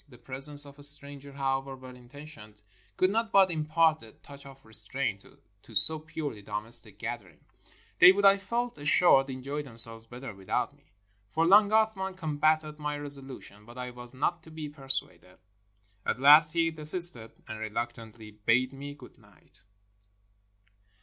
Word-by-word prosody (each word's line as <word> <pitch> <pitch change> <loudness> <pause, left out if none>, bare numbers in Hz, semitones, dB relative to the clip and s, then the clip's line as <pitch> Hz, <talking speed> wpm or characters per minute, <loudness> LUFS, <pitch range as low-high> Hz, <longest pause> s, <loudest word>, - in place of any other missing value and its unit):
The 125 - -17
presence 140 +4 0
of 140 0 -15
a - - -8
stranger, 140 -1 +1
however 135 0 -3
well 130 -1 -13
intentioned, 125 -5 -14 0.3
could 185 +1 +1
not 225 +1 -2
but 195 -2 +4
im 155 -2 -4
part 160 0 +1
a 110 -1 -15
touch 140 -1 -16
of 135 -1 -17
restraint 110 -1 -3 0.4
to 115 - -17
so 155 +11 +1
purely 150 -7 -7
domestic 105 +3 0
a - - -36
gather - - -7
ing. - - -25 0.6
They 180 - +9
would, 200 +1 -1
I 195 0 +6
felt 235 0 -5
assured, 145 -2 +4
enjoy 135 +3 -6
themselves 115 -4 -3
better 125 0 -10
without 95 -1 -4
me. - - -32 0.4
For 160 +7 -1
long 200 +4 +5
Athman 215 -3 -1
combated 155 -1 -1
my 150 0 -4
resolution, 135 -7 0
but 120 +3 -16
I 125 0 -7
was 120 +1 -11
not 170 +6 -2
to 165 - -17
be 155 -2 -8
persuaded. 135 - -5 0.7
At - - -3
last 150 +3 +6
he 165 -1 0
desisted, 155 -6 +6
and 110 0 -8
reluctantly 110 0 -7
bade 115 +5 -1
me 140 +1 -10
good 130 -4 -17
night. - - -26
140 Hz, 165 wpm, -27 LUFS, 120-155 Hz, 0.7 s, They